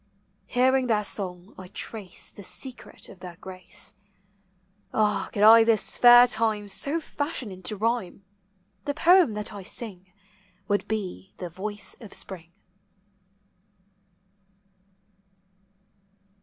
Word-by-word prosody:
Hearing 260 Hz, +1 st, +3 dB
their 210 Hz, -3 st, +1 dB
song, 185 Hz, -1 st, -3 dB
I 185 Hz, -, -9 dB
trace 200 Hz, 0 st, -6 dB
the -, -, -12 dB
secret 255 Hz, +6 st, -7 dB
of 190 Hz, -, -14 dB
their 180 Hz, -1 st, -9 dB
grace. 185 Hz, +3 st, -7 dB, 1.0 s
Ah, 210 Hz, -3 st, +1 dB
could 205 Hz, -, 0 dB
I 225 Hz, +1 st, +9 dB
this 225 Hz, -2 st, +2 dB
fair 240 Hz, 0 st, +9 dB
time 220 Hz, -3 st, 0 dB
so 280 Hz, +11 st, 0 dB
fashion 285 Hz, -7 st, -4 dB
into 185 Hz, +3 st, -3 dB
rhyme, 220 Hz, -3 st, -1 dB, 0.6 s
The 285 Hz, -, -2 dB
poem 340 Hz, -, +5 dB
that 210 Hz, 0 st, -4 dB
I 200 Hz, -, -7 dB
sing 200 Hz, 0 st, -3 dB, 0.6 s
w 200 Hz, -, -8 dB
r -, -, +4 dB
ould 205 Hz, -, 0 dB
be 195 Hz, -3 st, -5 dB
the 180 Hz, -2 st, -6 dB
voice 205 Hz, +3 st, -4 dB
of 215 Hz, -4 st, -9 dB
spring. 170 Hz, -3 st, -5 dB
210 Hz, 120 wpm, -26 LUFS, 190-235 Hz, 1.0 s, I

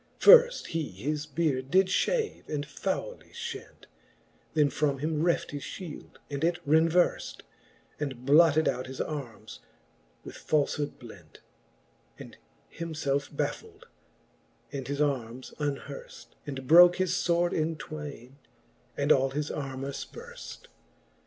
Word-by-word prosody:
Firft -, -, +7 dB
he 165 Hz, -1 st, -1 dB
his 150 Hz, +1 st, -4 dB
beard 140 Hz, -3 st, -1 dB
did 190 Hz, +4 st, +5 dB
fhave, 440 Hz, -, -1 dB
and 150 Hz, -1 st, -2 dB
fowly 195 Hz, -, -4 dB
flient: 470 Hz, 0 st, -8 dB, 0.7 s
Then 150 Hz, -2 st, +3 dB
from 145 Hz, 0 st, 0 dB
him 155 Hz, +2 st, -1 dB
reft 170 Hz, 0 st, +1 dB
his 145 Hz, -1 st, -5 dB
fhield, 170 Hz, -1 st, -8 dB
and 140 Hz, +1 st, -4 dB
it 170 Hz, +1 st, +2 dB
renverft, 165 Hz, +3 st, +2 dB, 0.6 s
And 130 Hz, -4 st, -5 dB
blotted 155 Hz, +2 st, +5 dB
out 125 Hz, +1 st, -1 dB
his 130 Hz, 0 st, -8 dB
armes 140 Hz, -7 st, -6 dB, 0.6 s
with -, -, -9 dB
falfhood 145 Hz, -1 st, -1 dB
blent, 95 Hz, -, -14 dB, 0.8 s
And -, -, -11 dB, 0.4 s
himfelfe 150 Hz, -4 st, -2 dB
baffuld, -, -, -4 dB, 0.9 s
and 135 Hz, -2 st, -5 dB
his 140 Hz, +1 st, -2 dB
armes 130 Hz, -4 st, -2 dB
unherft, 150 Hz, -, -5 dB, 0.2 s
And 135 Hz, -2 st, -5 dB
broke 175 Hz, +5 st, +8 dB
his 185 Hz, -1 st, 0 dB
fword 175 Hz, 0 st, +1 dB
in 160 Hz, +1 st, 0 dB
twaine, 145 Hz, -5 st, -8 dB, 0.6 s
and 145 Hz, +1 st, +1 dB
all 135 Hz, -1 st, +4 dB
his 145 Hz, +2 st, -3 dB
armour 135 Hz, -1 st, -4 dB
fperflr. 475 Hz, -, -9 dB
150 Hz, 125 wpm, -28 LUFS, 140-170 Hz, 0.9 s, broke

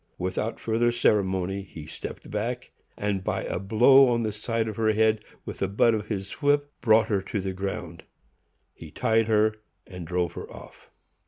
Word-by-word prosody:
Without 95 Hz, +5 st, -3 dB
further 115 Hz, +1 st, +1 dB
ceremony, 95 Hz, -4 st, +1 dB
he 85 Hz, -5 st, -10 dB
stepped -, -, -8 dB
back, 120 Hz, +4 st, -3 dB, 0.3 s
and, 100 Hz, -2 st, -1 dB
by -, -, -2 dB
a -, -, -3 dB
blow 120 Hz, +8 st, +6 dB
on 120 Hz, -1 st, +1 dB
the 110 Hz, -, -1 dB
side 115 Hz, +2 st, -2 dB
of 110 Hz, -, -4 dB
her 110 Hz, 0 st, +2 dB
head 110 Hz, 0 st, +2 dB, 0.2 s
with -, -, -7 dB
the 95 Hz, -, 0 dB
butt 105 Hz, +4 st, +3 dB
of 105 Hz, -1 st, -2 dB
his 95 Hz, -3 st, -4 dB
whip, 145 Hz, 0 st, +2 dB
brought 110 Hz, -1 st, +5 dB
her 100 Hz, -3 st, +1 dB
to 100 Hz, +2 st, -4 dB
the 95 Hz, 0 st, -3 dB
ground; 95 Hz, +1 st, -5 dB, 0.7 s
he -, -, -11 dB
tied 115 Hz, 0 st, +1 dB
her, 110 Hz, 0 st, +2 dB, 0.3 s
and 90 Hz, -3 st, -9 dB
drove 90 Hz, 0 st, -1 dB
her -, -, -8 dB
off. -, -, -13 dB
105 Hz, 180 wpm, -26 LUFS, 95-115 Hz, 0.7 s, blow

